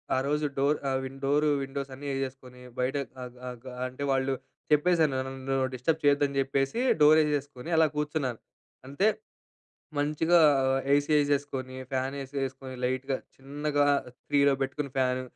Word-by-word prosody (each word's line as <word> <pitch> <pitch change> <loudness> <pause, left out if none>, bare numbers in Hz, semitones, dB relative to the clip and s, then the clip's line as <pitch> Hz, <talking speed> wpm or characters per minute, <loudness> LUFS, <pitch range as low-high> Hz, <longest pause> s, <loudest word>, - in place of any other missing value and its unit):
ఆ - - +2
రోజు 150 +1 0
డోర్ 145 +2 +3 0.2
అవి 130 0 -2 0.2
డోర్ 145 +2 +3 0.2
విండోస్ 135 0 -5
అన్నీ 145 +2 -8
ఏసేసుకొని, 130 -2 -5 0.2
బయట 125 +2 0 0.3
అగ్ 125 0 -10
అగ్ 125 +1 -10 0.2
అంటే 130 +2 -7
వాళ్ళు 135 0 +1 0.4
చెప్పేసాను 155 -1 +3
నన్ను 135 0 -3 0.2
డిస్టర్బ్ 150 +6 0
చేయొద్దు 145 0 +4
అని 140 0 -2
చెప్పేసి, 135 - 0 0.2
డోర్ 155 +1 +8
ఏసేసుకొని 145 -1 -3
అలా 160 -1 +6
కూర్చున్నాను. 150 -5 -1 0.5
అంతే, 145 +10 +1 0.9
మంచిగా 155 +4 +3 0.5
ఏసీ 145 +2 +2
ఏసేసుకొని, 140 -3 -1 0.2
ఫ్యాన్ 130 +1 -1
ఏసేసుకొని, 135 -1 -5
లైట్‌గా 130 +1 -1 0.2
చిన్నగా 145 +2 -1 0.4
3లో 140 -1 +4
పెట్టుకొని 140 +2 -2
ఫ్యాన్, 130 -1 +1
135 Hz, 135 wpm, -28 LUFS, 130-145 Hz, 0.9 s, డోర్